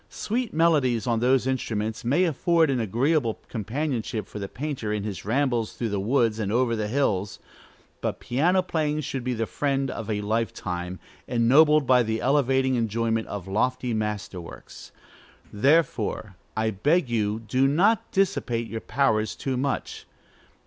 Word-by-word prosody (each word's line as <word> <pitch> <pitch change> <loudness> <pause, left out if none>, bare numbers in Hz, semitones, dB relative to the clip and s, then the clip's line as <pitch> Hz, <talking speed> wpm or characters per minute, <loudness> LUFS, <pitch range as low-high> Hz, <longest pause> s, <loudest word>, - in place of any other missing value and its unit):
Sweet 235 +1 -2
melodies 150 -8 +2
on 120 -2 +1
those 130 +2 +3
instruments 110 -4 -2
may 140 +10 +2
afford 165 -1 +2
an 130 - 0
agreeable 120 - +1
companionship 115 -2 -3
for 105 - -8
the 100 - -4
painter 130 -3 -4
in 105 -1 -2
his 100 -3 -5
rambles 120 -1 0
through 115 - -3
the 100 -1 -1
woods 115 +1 +1
and 105 -2 -1
over 120 0 +2
the 105 -1 -2
hills; 105 -6 0 0.6
but - - -2
piano 175 +9 +2
playing 155 -3 -1
should 135 -2 -4
be 125 0 -1
the 115 0 -1
friend 135 +1 -1
of 115 -1 -6
a 105 -1 -1
life 110 0 -1
time, 90 0 -4 0.3
ennobled 140 +5 +4
by 125 -1 +5
the 110 -1 -1
elevating 130 0 +2
enjoyment 115 -1 0
of 100 -3 -6
lofty 125 +4 0
master 105 -4 -3
works. 85 - -12 0.6
Therefore, 110 - +1 0.2
I 110 0 +1
beg 145 - +1
you, 110 -2 0
do 130 +4 +1
not 205 +10 +2
dissipate 120 - 0
your 115 0 -6
powers 110 -5 +1
too 135 -2 -3
much. 135 +2 -3
120 Hz, 155 wpm, -25 LUFS, 110-140 Hz, 0.6 s, by